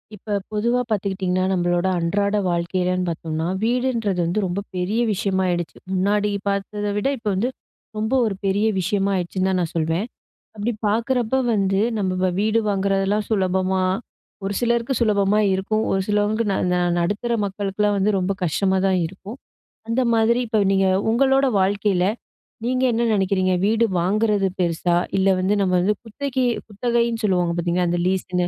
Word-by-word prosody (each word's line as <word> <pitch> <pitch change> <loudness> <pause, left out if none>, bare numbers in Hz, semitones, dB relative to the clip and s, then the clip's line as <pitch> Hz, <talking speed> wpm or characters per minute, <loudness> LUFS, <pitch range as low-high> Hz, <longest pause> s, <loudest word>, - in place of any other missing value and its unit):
இப்ப 205 +1 -4 0.2
பொதுவா 235 +4 +1
பாத்துக்கிட்டிங்கன்னா, 190 -3 -1
நம்பளோட 175 0 +1
அன்றாட 200 +4 0
வாழ்க்கையிலன்னு 180 +1 -1
பார்த்தோம்னா, 160 0 -3 0.2
வீடுன்றது 235 -5 0
வந்து 175 +5 0
ரொம்ப 180 +1 -2 0.2
பெரிய 185 +5 -1
விஷயமாயிடுச்சு. 185 -3 -1 0.2
முன்னாடி 205 +2 +1 0.2
பார்த்தத 205 +1 -2
விட 205 - 0
இப்ப 225 -2 -8
வந்து, 220 +7 0 0.5
ரொம்ப 220 +3 -1
ஒரு 210 -3 -1
பெரிய 200 +2 +1
விஷயமா 195 +2 0
ஆயிடுச்சுன்னு 185 +1 -1
தான் 185 -1 +1
நான் 165 - -3
சொல்லுவேன். 165 +4 0 0.5
அப்டி 215 +3 -2
பாக்குறப்போ 235 +3 0 0.2
வந்து, 195 -1 +1 0.2
நம்ம 190 -3 -1
வ 185 - +3
வீடு 220 +2 +2
வாங்குறதெல்லாம் 195 +1 0
சுலபமா? 190 -2 +1 0.6
ஒரு 200 - -2
சிலருக்கு 235 +1 0
சுலபமா 205 -2 +2
இருக்கும். 215 +3 0
ஒரு 195 - +1
சிலவங்களுக்கு 210 +1 +1
ந - - 0 0.2
ந - - +2 0.2
நடுத்தர 205 +7 -1
மக்களுக்குலாம் 200 +1 -1
வந்து, 200 +2 +2
ரொம்ப 185 +1 -1
கஷ்டமா 190 +3 +1
தான் 190 -1 +2
இருக்கும். 195 +6 -10 0.5
அந்த 230 +3 +1
மாதிரி 225 +1 +3
இப்போ 220 -1 0
நீங்க 195 0 +3 0.2
உங்களோட 270 +3 +3
வாழ்க்கையில, 195 -1 +1 0.6
நீங்க 255 +1 0
என்ன 235 +1 +1
நெனைக்கிறீங்க? 190 -2 +1
வீடு 225 +2 +3 0.2
வாங்குறது 205 +2 +1
பெருசா? 175 0 +1 0.2
இல்ல 190 +1 +3
வந்து 190 +3 +1
நம்ம 185 -2 +1
வந்து, 205 +4 +1
குத்தக்கி 260 +3 -2 0.2
குத்தகைன்னு 235 +2 -1
சொல்லுவாங்க 180 -4 +1
பார்த்தீங்களா, 175 +1 0
அந்த 175 0 0
லீஸ்ன்னு, 180 -1 0
200 Hz, 150 wpm, -22 LUFS, 185-215 Hz, 0.6 s, வ